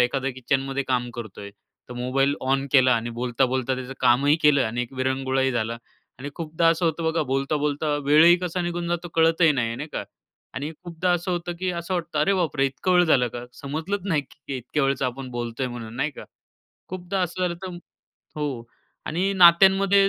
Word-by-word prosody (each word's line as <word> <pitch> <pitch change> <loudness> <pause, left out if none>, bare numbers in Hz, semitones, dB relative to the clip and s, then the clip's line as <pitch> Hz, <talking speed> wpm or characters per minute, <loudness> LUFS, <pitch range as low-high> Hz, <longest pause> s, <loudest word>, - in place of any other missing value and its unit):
एखाद्या 135 +2 +1
किचनमध्ये 135 +2 -1
काम 125 -1 0
करतोय, 105 -3 -8 0.4
तर 125 - -8
मोबाईल 135 +3 +1
ऑन 135 +1 0
केला 130 -2 +6
आणि 115 +1 -2
बोलता-बोलता 125 +2 0
त्याचं 130 0 -6
कामही 130 +4 +4
केलं 145 -2 +5
आणि 120 +2 -2
एक 125 - -8
विरंगुळाही 130 0 0
झाला. 115 -1 -1 0.4
आणि 140 +3 -6
खूपदा 165 0 0
असं 165 +1 +2
होतं 165 0 0
बघा, 160 0 +1
बोलता-बोलता 145 +2 -1
वेळही 155 +5 +6
कसा 180 0 -3
निघून 175 0 -3
जातो 175 0 -2
कळतही 165 0 +4
नाही, 115 -4 -1
नाही 150 - -6
का? - - -3 0.5
आणि 145 +4 -4
खूपदा 175 +1 -2
असं 175 +1 -1
होतं, 175 0 -2
की 185 0 -1
असं 170 +1 -3
वाटतं, 170 -3 -3
"अरे, 155 +7 +3
बापरे, 150 -6 +1
इतका 135 +7 -3
वेळ 180 0 +5
झालं 130 -7 +3
का? 120 +1 -7
समजलंच 160 +10 -4
नाही, 155 -5 +1
की 135 0 -9
इतक्या 130 +4 -2
वेळचं 135 0 0
आपण 130 +1 -5
बोलतोय 120 +1 -3
म्हणून 120 -2 -7
नाही 150 +4 0
का." 145 - -11 0.7
खूपदा 185 +1 -3
असं 180 +1 -3
झालं 180 -1 0
तर 180 -2 -6 0.6
हो. 140 -6 -3 0.4
आणि 185 +5 0
नात्यांमध्ये 195 +3 +6
145 Hz, 180 wpm, -24 LUFS, 130-170 Hz, 0.7 s, केला